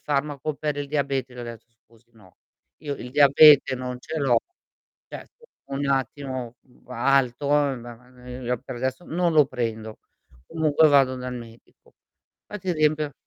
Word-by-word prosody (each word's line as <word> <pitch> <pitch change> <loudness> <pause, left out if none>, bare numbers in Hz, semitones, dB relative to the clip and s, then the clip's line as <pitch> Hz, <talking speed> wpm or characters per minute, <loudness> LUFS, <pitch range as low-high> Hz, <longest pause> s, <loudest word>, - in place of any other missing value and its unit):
farmaco 145 0 -2
per 150 0 -3
il 145 0 -4
diabete. 135 -3 -2
Gli - - -12
ho - - -5
detto: 115 -1 -9 0.2
"Scusi, 115 +1 -26
no, 100 -5 -21 0.4
io 145 -1 -5
il 125 -2 -9
diabete 145 0 +6
non 125 0 -6
ce 160 - -5
l'ho". 130 -5 +3 0.7
Cioè - - -9 0.5
un 140 +1 -2
attimo 130 -2 -3 0.3
alto, 130 +2 +1
ma, 125 -5 -1 0.2
ehm, 125 -1 -4
per - - -7
adesso 130 +6 -4
non 175 +1 0
lo 150 -3 +6
prendo. 110 -4 -5 0.5
Comunque 160 -1 +3
vado 135 -2 +4
dal 125 0 -6
medico. 115 -1 -13 0.5
Qua 210 - -7
ti 185 -2 -3
riempio 155 -2 0
135 Hz, 150 wpm, -24 LUFS, 125-145 Hz, 0.7 s, diabete